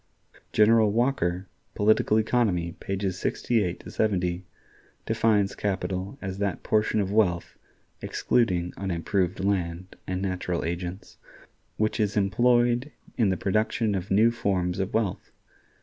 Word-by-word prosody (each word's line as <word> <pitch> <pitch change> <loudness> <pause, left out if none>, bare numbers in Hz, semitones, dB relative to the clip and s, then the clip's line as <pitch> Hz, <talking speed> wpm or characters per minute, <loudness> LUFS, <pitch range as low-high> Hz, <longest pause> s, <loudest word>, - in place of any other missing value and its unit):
General 110 0 +5
Walker 100 -6 0 0.3
("Political 110 +1 +3
Economy," 105 -7 +1
pages 95 -1 -3
68 105 -7 -1
70) 90 -4 -1 0.6
defines 110 -3 +2
capital 95 +2 -3
as 95 0 -5
that 100 -2 -2
portion 110 0 +1
of 100 -1 -1
wealth 95 -5 +1 0.5
(excluding 90 -7 0
unimproved 95 0 -1
land 90 -2 -2
and 90 0 -2
natural 90 -3 -2
agents) 85 +2 -5 0.6
which 110 +1 0
is 105 -1 0
employed 120 +6 +2 0.2
in 110 -5 +2
the 95 - 0
production 110 +2 0
of 95 -1 -3
new 110 +4 +4
forms 95 -6 -1
of 95 +1 -1
wealth. 110 -5 -1
100 Hz, 120 wpm, -26 LUFS, 90-110 Hz, 0.6 s, General